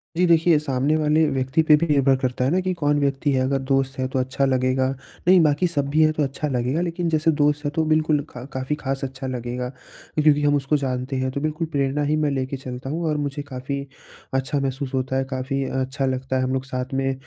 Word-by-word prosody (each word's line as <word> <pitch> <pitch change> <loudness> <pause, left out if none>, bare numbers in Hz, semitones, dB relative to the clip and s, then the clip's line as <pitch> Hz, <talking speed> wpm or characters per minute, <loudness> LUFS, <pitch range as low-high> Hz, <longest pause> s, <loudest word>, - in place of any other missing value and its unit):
जी, 180 +2 +3
देखिए 165 -1 +5
सामने 140 0 0
वाले 155 +1 +3
व्यक्ति 135 +2 +1
पे 155 -1 +6
भी 170 +3 0
निर्भर 140 -3 +4
करता 125 -1 -1
है 135 - +1
ना 180 - +2
कि 185 0 -1
कौन 145 -4 +1
व्यक्ति 140 0 0
है? 130 -1 +2
अगर 135 +1 0
दोस्त 135 0 0
है 130 - 0
तो 130 0 -2
अच्छा 130 +2 0
लगेगा, 130 0 +1 0.4
नहीं 185 0 +7
बाकी 150 +3 +2
सब 145 -5 -1
भी 155 +3 +2
है 155 - +4
तो 155 -1 0
अच्छा 140 +2 -2
लगेगा, 130 +3 0
लेकिन 175 0 -1
जैसे 160 0 +2
दोस्त 145 0 +1
है 145 - 0
तो 160 - +2
बिल्कुल 155 -2 +2
क 125 0 -7
काफ़ी 130 +3 -2
ख़ास 135 -2 -3
अच्छा 135 0 -5
लगेगा। 125 0 -3
क्योंकि 150 +3 -1
हम 145 0 +3
उसको 140 +2 +1
जानते 130 -1 -3
हैं 130 0 0
तो 140 - -4
बिल्कुल 155 +2 -2
प्रेरणा 140 0 0
ही 150 +1 +1
मैं 150 -2 +1
लेके 135 0 -2
चलता 130 0 -7
हूँ। 165 +4 -2
और 150 - 0
मुझे 145 0 -3
काफ़ी 135 0 -5 0.5
अच्छा 135 +2 0
महसूस 135 0 -3
होता 130 0 -1
है, 135 - +1
काफ़ी 130 +1 -2
अच्छा 130 +1 -2
लगता 130 0 -2
है 130 - +1
हम 130 - -1
लोग 130 0 -2
साथ 130 0 -4
में 135 0 0
140 Hz, 235 wpm, -23 LUFS, 130-150 Hz, 0.5 s, नहीं